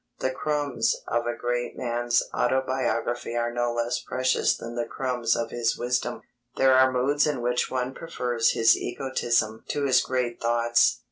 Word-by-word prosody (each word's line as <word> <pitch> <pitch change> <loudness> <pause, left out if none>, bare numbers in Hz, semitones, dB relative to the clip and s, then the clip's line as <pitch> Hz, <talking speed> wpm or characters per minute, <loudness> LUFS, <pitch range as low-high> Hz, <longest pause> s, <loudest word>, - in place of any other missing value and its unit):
The 130 - -1
crumbs 145 -3 0
of 120 0 -1
a 120 - -1
great 120 0 -2
man's 120 0 0
autobiography 120 -2 -1
are 120 0 -1
no 120 0 0
less 120 0 -1
precious 130 0 0
than 115 0 -7
the 120 -1 -3
crumbs 120 -3 -1
of 115 -1 -3
his 115 -1 0
wisdom. 125 0 -2 0.3
There 135 0 +5
are 130 0 +5
moods 140 +4 +2
in 145 -4 -1
which 125 0 0
one 130 0 -2
prefers 125 -8 -1
his 115 0 +5
egotism 120 -4 -1
to 145 - -2
his 130 - +4
great 125 -2 -2
thoughts. 120 0 +2
120 Hz, 160 wpm, -26 LUFS, 120-130 Hz, 0.3 s, There